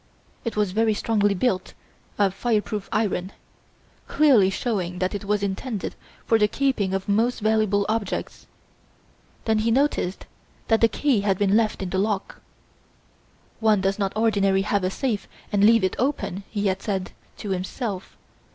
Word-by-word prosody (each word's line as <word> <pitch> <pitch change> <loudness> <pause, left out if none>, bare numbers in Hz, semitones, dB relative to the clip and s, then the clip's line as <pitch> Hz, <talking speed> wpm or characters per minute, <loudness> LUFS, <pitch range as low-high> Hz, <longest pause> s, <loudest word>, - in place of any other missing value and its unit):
It 230 - -3
was 210 -3 +1
very 220 +2 +2
strongly 205 -2 +1
built 190 -3 -1 0.4
of 200 -2 +2
fire 220 +2 +1
proof 210 -2 -5
iron, 200 -3 -1 0.7
clearly 260 -11 +5
showing 195 -4 -2
that 185 +2 -1
it 205 0 -5
was 205 0 0
intended 200 +2 -3 0.3
for 225 - +3
the 210 - +4
keeping 210 -6 0
of 195 - -3
most 225 +5 +1
valuable 215 -2 +2
objects. 220 -1 -3 1.0
Then 220 -1 +2
he 220 +2 +1
noticed 245 -7 0 0.4
that 225 -1 +3
the 230 - +7
key 255 -1 +1
had 195 -2 +1
been 200 0 +2
left 215 -3 +1
in 180 - -4
the 190 - 0
lock. 200 -1 -2 1.2
"One 220 -2 +3
does 195 +2 0
not 195 -1 -1
ordinarily 200 -3 +2
have 200 -1 0
a 185 - +1
safe 220 0 -2 0.2
and 205 -1 +2
leave 225 0 +6
it 185 - +1
open!" 235 -8 -2
he 205 -1 -2
had 190 -1 0
said 190 -3 -3 0.3
to 205 - -5
himself. 190 +2 -4
205 Hz, 160 wpm, -24 LUFS, 195-225 Hz, 1.2 s, the